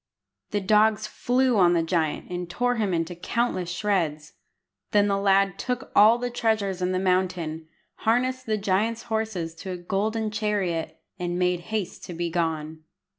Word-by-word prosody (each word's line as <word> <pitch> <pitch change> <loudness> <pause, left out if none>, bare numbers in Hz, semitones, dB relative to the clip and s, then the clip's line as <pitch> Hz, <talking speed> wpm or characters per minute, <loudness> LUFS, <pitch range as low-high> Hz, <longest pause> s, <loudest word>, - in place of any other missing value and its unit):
The 205 - -1
dogs 215 +2 +3
flew 250 +2 +1
on 175 -2 +5
the 170 -1 +2
giant, 165 -1 -1
and 175 -1 -4
tore 245 +6 0
him 210 -4 0
into 165 0 -1
countless 185 0 -1
shreds. 170 -5 -1 0.6
Then 205 -2 +4
the 200 -1 +1
lad 195 -1 +3
took 250 +1 -3
all 215 +3 +7
the 245 0 -3
treasures 215 -6 0
in 180 0 +1
the 185 - 0
mountain, 180 -4 0 0.3
harnessed 255 +3 0
the 215 -1 +1
giant's 210 +3 0
horses 205 -7 -2
to 190 - -7
a 180 - -3
golden 215 +5 -1
chariot, 205 -6 -1 0.2
and 175 0 -2
made 180 -1 +1
haste 215 -5 -3
to 175 - -7
be 170 0 -2
gone. 160 -2 -2
195 Hz, 165 wpm, -25 LUFS, 175-220 Hz, 0.6 s, all